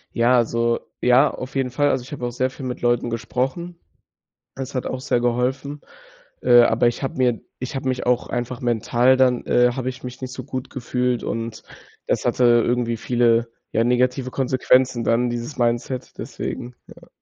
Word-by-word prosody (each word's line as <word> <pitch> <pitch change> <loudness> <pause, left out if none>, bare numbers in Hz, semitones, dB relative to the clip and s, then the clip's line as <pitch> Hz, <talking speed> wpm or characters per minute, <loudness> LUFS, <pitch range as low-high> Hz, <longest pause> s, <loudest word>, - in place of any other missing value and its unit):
Ja, 120 +1 +4
also, 115 0 +1 0.2
ja, 125 +4 +5
auf 130 +2 -8
jeden 135 -1 0
Fall. 145 +3 +2
Also, 130 - 0
ich 130 - -13
habe 130 -4 -4
auch 120 - -2
sehr 130 +2 0
viel 130 - -9
mit 125 -1 -5
Leuten 120 0 +1
gesprochen. 135 +9 -3 0.8
Das 135 0 -6
hat 130 - -2
auch 130 - -4
sehr 125 - +1
geholfen. 130 +4 -1 0.6
Äh, 120 -1 +7
aber 120 +1 +3
ich 120 - -2
habe 135 - -3
mir 125 -3 +1 0.2
ich 130 +3 -5
habe 135 0 -3
mich 125 -1 -2
auch 125 -1 +1
einfach 120 +2 -3
mental 120 +2 +2
dann, 125 -2 +3
äh, 125 0 +4
habe 130 0 -3
ich 130 0 -9
mich 125 +1 -8
nicht 130 0 -5
so - - -7
gut 130 -1 -6
gefühlt 125 -1 -1
und 115 -1 -4 0.4
das - - 0
hatte 125 - +1
irgendwie 120 0 +3
viele, 120 0 +2 0.2
ja, 115 - +2
negative 125 +2 +1
Konsequenzen 130 -2 +2
dann 120 +2 +2
dieses 120 +4 -5
Mindset, 120 +1 -1
deswegen 125 0 -6
ja. - - -15
125 Hz, 185 wpm, -22 LUFS, 120-130 Hz, 0.8 s, Äh